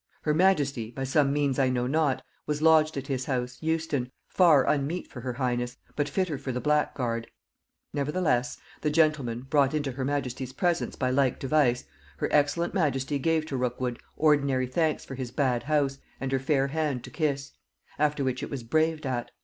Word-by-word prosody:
Her 150 - +2
majesty, 145 -10 +2
by 135 +3 -5
some 140 +1 +2
means 145 -2 +1
I 130 -1 +3
know 125 -1 0
not, 140 0 +1 0.2
was 150 -1 -1
lodged 155 -2 +5
at 135 - -3
his 130 -2 -2
house, 125 -1 -2
Euston, 160 -5 -1 0.2
far 165 -7 +5
unmeet 150 +5 0
for 125 - -8
her 125 0 -3
highness, 120 -1 -2 0.2
but 145 -1 0
fitter 180 -7 -1
for 135 -2 -4
the 125 - -2
black 150 +2 +1
guard; 115 -3 -2 0.7
nevertheless, 145 -4 0 0.2
(the 150 - +1
gentleman 150 -7 +2
brought 140 +1 +2
into 145 -3 -1
her 130 +1 -4
majesty's 130 -2 -2
presence 175 -2 0
by 130 - 0
like 130 -1 +2
device) 135 -3 +2 0.3
her - - -1
excellent 150 +4 +2
majesty 145 -5 0
gave 160 +2 +1
to 145 - -4
Rookwood 125 0 -2 0.2
ordinary 140 -4 +3
thanks 155 +4 0
for - - -8
his 130 -2 -4
bad 125 -2 +1
house, 140 -3 0 0.2
and 135 -1 -3
her 135 - +2
fair 135 0 +1
hand 150 -4 -1
to - - -10
kiss; 140 -3 -1 0.5
after 150 -1 +1
which 130 0 -1
it - - -4
was 135 -4 -5
braved 155 +5 +1
at. 125 -2 -2
140 Hz, 185 wpm, -27 LUFS, 130-150 Hz, 0.7 s, lodged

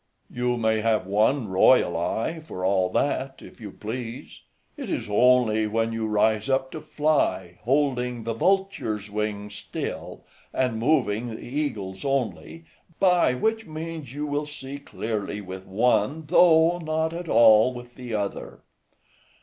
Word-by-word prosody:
"You 125 0 -1
may 110 -1 +1
have 110 -3 +1
one 110 +6 +1
royal 95 +1 +4
eye, 110 - -2
for 95 - -6
all 95 -1 +2
that, 135 +5 -1
if - - -14
you 105 - -7
please; 115 +4 -7 0.3
it - - -7
is - - -3
only 110 0 +3
when 115 +1 -1
you 115 -1 -2
rise 110 +2 +1
up 130 0 0
to 160 - -7
fly, 150 - 0
holding 125 -3 0
the 115 +1 -2
vulture's 115 - 0
wing 105 -1 -3
still, 105 - -6 0.3
and 125 -4 0
moving 120 -4 +1
the 110 - -7
eagle's 110 -9 -4
only; 140 +4 -3 0.3
by 180 -8 +4
which 220 - -1
means, 155 -3 -6
you 145 +3 -4
will 145 0 -2
see 140 -1 -8
clearly 110 -6 -4
with 95 -1 -9
one, 115 +8 +1
though 170 +1 +5
not 160 0 -1
at 170 -1 -6
all 110 +1 +6
with 120 -1 -10
the 125 -3 -6
other." 100 -1 -4
120 Hz, 145 wpm, -25 LUFS, 105-145 Hz, 0.3 s, all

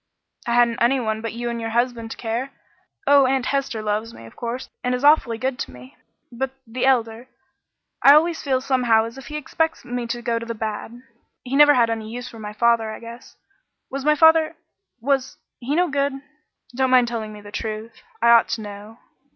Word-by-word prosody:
"I 235 - +1
hadn't 240 -1 +3
any 255 +3 +3
one 220 -2 -2
but 230 -1 -4
you 240 +1 -3
and 235 0 -4
your 225 - -3
husband 235 0 -1
to - - -7
care. 235 +4 -3 0.6
Oh, 280 -2 +6
Aunt 265 -1 0
Hester 270 -6 -2
loves 215 +2 -2
me, 115 - -12
of 115 - -14
course, 240 +2 -5 0.2
and 250 0 0
is 250 - -5
awfully 285 -6 +4
good 260 +1 -2
to - - -4
me 125 +1 -14 0.4
but 260 +3 -3 0.2
the 245 +3 -2
Elder 235 -2 +1 0.7
I 280 +1 +8
always 325 +2 +2
feel 260 -2 0
somehow 250 -4 +2
as 230 +4 -8
if 260 - -12
he 300 - -7
expects 320 +2 -2
me 245 -1 -4
to 240 0 -4
go 230 -1 0
to 230 - -7
the 230 - -4
bad. 220 +3 -5 0.4
He 260 +2 -3
never 290 0 +7
had 235 -2 +3
any 220 -1 -4
use 245 +2 -6
for 230 - -11
my 210 -1 -6
father, 230 0 +2
I 220 - -7
guess. 235 +1 -12 0.6
Was 275 0 -4
my 300 +1 +4
father 320 +1 +5 0.4
was 265 +1 -1 0.2
he 265 +4 -2
no 355 +2 +3
good? 280 -1 0 0.6
Don't 260 0 +1
mind 250 -1 +5
telling 225 -2 -4
me 210 -1 -11
the 205 0 -12
truth: 220 +1 -6 0.2
I 235 - +5
ought 235 -1 +6
to - - -8
know." 205 +2 -10
240 Hz, 210 wpm, -22 LUFS, 225-265 Hz, 0.7 s, I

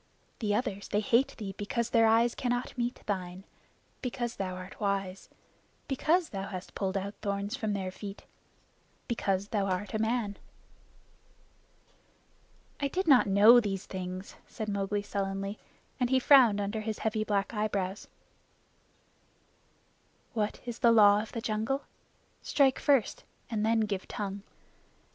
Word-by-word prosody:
The 210 -3 0
others 205 -4 -2
they 205 - +1
hate 245 +6 +2
thee 200 -3 -5
because 235 +3 -2
their 225 -1 +5
eyes 230 +2 +4
cannot 245 0 -2
meet 240 0 -3
thine; 185 -2 -4 0.6
because 240 -2 -3
thou 185 -2 -3
art 185 +1 -9
wise; 195 -2 -2 0.6
because 320 +5 +1
thou 195 -1 -5
hast 185 -2 -7
pulled 195 -1 -1
out 200 +1 -4
thorns 200 +2 -2
from 220 -6 -2
their 190 -2 -3
feet 200 +1 -8 0.8
because 200 -4 -1
thou 200 -3 0
art 190 +1 -2
a 215 - 0
man." 220 -2 -1 2.4
"I 285 - +1
did 370 +6 -2
not 260 -7 +6
know 210 +5 +8
these 200 -4 -3
things," 185 0 -6
said 215 -1 -5
Mowgli 200 0 -1
sullenly, 195 0 -3 0.4
and 245 -1 +1
he 260 - +4
frowned 250 -6 +6
under 205 +2 -2
his 215 0 -3
heavy 215 0 +1
black 205 0 -1
eyebrows. 205 -2 -2 2.3
"What 215 -3 -2
is 240 -1 -5
the 235 -4 +5
Law 205 -2 +6
of 220 - -8
the 230 - -4
Jungle? 225 +6 -1 0.6
Strike 270 -3 +2
first 275 -8 +2 0.3
and 215 -2 0
then 225 +1 +3
give 200 -3 -2
tongue. 200 -1 -4
210 Hz, 140 wpm, -30 LUFS, 195-235 Hz, 2.4 s, know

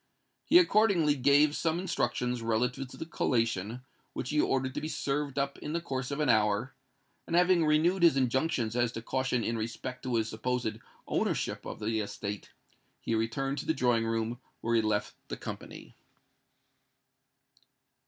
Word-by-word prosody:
He - - +6
accordingly 205 - +4
gave 145 +2 +4
some 165 0 0
instructions 125 -8 -1
relative 125 +4 0
to - - -12
the - - -5
collation, 115 - -1 0.3
which 125 - -4
he 150 0 +3
ordered 130 -1 0
to - - -3
be 155 - -3
served 145 -2 -2
up 140 0 -1
in 150 - -5
the 170 - 0
course 130 -6 -4
of 140 +1 -3
an 150 - +1
hour; 110 +1 +2 0.5
and, 170 - -1
having 180 -1 +4
renewed 160 +5 +3
his 165 -5 +6
injunctions 130 -2 0
as 120 -1 +2
to 115 - -6
caution 130 -1 0
in 115 +1 -1
respect 125 +3 -5
to 125 -2 -2
his 110 -1 +1
supposed 115 0 -2 0.3
ownership - - -1
of - - -6
the 110 +1 -1
estate, 100 -1 -5 0.5
he - - -3
returned 135 +5 -1
to - - -6
the 160 - +2
drawing 120 -4 +2
room 115 +1 -1 0.2
where 115 - -1
he 115 - +5
had 110 - 0
left 105 -1 0
the - - -5
company. - - -8
125 Hz, 170 wpm, -30 LUFS, 115-150 Hz, 0.5 s, He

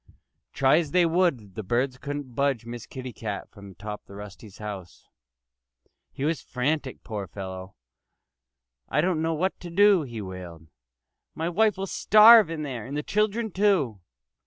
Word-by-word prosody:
Try 135 +2 +4
as 160 -4 -3
they 180 +3 +3
would, 165 - +1
the 110 - -5
birds 125 +5 -1
couldn't 145 -2 -6
budge 135 -3 0
Miss 120 -1 -8
Kitty 130 -2 -7
Cat 105 -3 -6
from 100 -3 -12
the 95 - -14
top 105 +3 -7
of 100 - -11
Rusty's 100 0 -11
house. 100 -4 -8 1.0
He 135 - -4
was 160 0 0
frantic, 135 +1 -2
poor 105 -4 -5
fellow! 95 -1 -8 1.1
"I 150 - +1
don't 175 -2 0
know 165 0 0
what 185 +5 -1
to 175 - -8
do," 200 +1 +5
he 120 -6 -7
wailed. 90 -5 -9 0.7
"My 165 +2 -2
wife 210 +3 +2
will 195 - -2
starve 215 0 +7
in 160 -2 -4
there 130 -6 -5
and 140 +2 -4
the 150 - -2
children, 215 +3 0
too." 180 - +1
135 Hz, 165 wpm, -26 LUFS, 105-170 Hz, 1.1 s, starve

